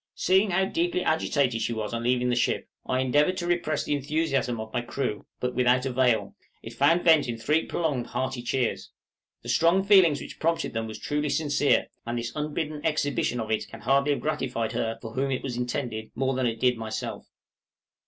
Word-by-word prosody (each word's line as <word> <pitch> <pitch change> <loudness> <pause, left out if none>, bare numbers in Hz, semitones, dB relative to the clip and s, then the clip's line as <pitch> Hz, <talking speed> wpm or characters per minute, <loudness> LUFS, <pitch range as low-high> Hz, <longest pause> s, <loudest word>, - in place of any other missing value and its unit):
Seeing 190 +3 +3
how 190 +1 +2
deeply 175 0 0
agitated 140 -6 +1
she 120 - -1
was 110 0 -4
on 115 - -2
leaving 125 +1 +1
the 120 - +2
ship, 120 - 0 0.2
I 130 0 +1
endeavored 145 +8 +2
to 175 - -3
repress 175 -3 0
the - - -1
enthusiasm 140 -4 0
of 110 0 -7
my 120 - 0
crew, 120 -3 -4
but 125 0 -2
without 125 +1 +3
avail; 125 -6 +1 0.3
it 115 - -8
found 145 +8 +3
vent 160 -5 +5
in 120 -1 -3
three 150 +8 +1
prolonged, 145 -8 -1
hearty 130 -1 -3
cheers. 125 0 -1 0.5
The - - -7
strong 170 +4 +3
feeling 190 -5 +6
which - - -8
prompted 165 0 0
them 115 0 -2
was 110 - -7
truly 150 0 -2
sincere; 145 -1 +2 0.2
and 120 +1 -3
this 120 0 -4
unbidden 150 0 -3
exhibition 145 -5 0
of 110 -1 -4
it 110 - -1
can - - -11
hardly 135 +5 +2
have - - -4
gratified 130 -7 -2
her 115 0 -2
for 115 -1 -7
whom 135 +2 0
it 130 - -2
was 130 -3 -3
intended 120 -3 -3
more 135 +2 0
than 130 -1 0
it 115 -1 -3
did 125 -1 +2
myself. 110 -1 -5
130 Hz, 200 wpm, -26 LUFS, 120-155 Hz, 0.5 s, feeling